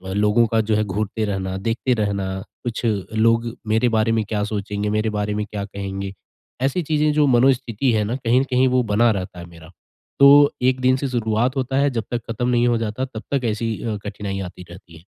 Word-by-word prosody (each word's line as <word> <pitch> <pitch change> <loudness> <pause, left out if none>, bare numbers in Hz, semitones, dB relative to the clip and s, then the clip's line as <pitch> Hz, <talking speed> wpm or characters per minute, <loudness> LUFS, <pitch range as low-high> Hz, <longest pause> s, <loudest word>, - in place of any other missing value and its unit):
लोगों 105 +3 +3
का 115 +1 +1
जो 110 0 0
है 105 - +2
घूरते 105 +2 -2
रहना, 95 -2 -3
देखते 115 +5 -1
रहना, 100 -3 -1 0.4
कुछ 120 -2 -3 0.3
लोग 115 +1 +2 0.2
मेरे 110 +3 +2
बारे 110 0 +1
में 110 -1 +1
क्या 105 -2 -1
सोचेंगे, 105 0 -3
मेरे 110 +1 0
बारे 105 0 -2
में 105 0 -2
क्या 105 -1 -5
कहेंगे। 100 -1 -5 0.5
ऐसी 140 +7 +1
चीज़ें 150 0 +1
जो 150 -1 +3
मनोस्थिति 125 -1 +2
है 105 -1 +2
ना, 115 +4 -2
कहीं 125 -1 +2
न - - +1
कहीं 130 +1 +4
वो 125 0 +2
बना 115 +2 +4
रहता 90 -3 -5
है 85 - -8
मेरा। 85 0 -14 0.5
तो 140 +1 +8
1 130 +1 +2
दिन 130 0 +4
से 140 - -2
शुरुआत 120 +2 0
होता 135 +1 -1
है, 140 0 +3
जब 115 -4 -3
तक 120 -1 -1
खत्म 120 +2 -2
नहीं 120 0 +3
हो 120 -1 +2
जाता, 115 +3 -2
तब 115 -4 -9
तक 130 -3 0
ऐसी 115 +1 -1
ही 110 -3 -2
कठिनाई 100 -1 -4
अ, 95 - -4
आती 90 0 -10
रहती 85 -2 -13
है। 80 - -18
110 Hz, 220 wpm, -21 LUFS, 105-125 Hz, 0.5 s, तो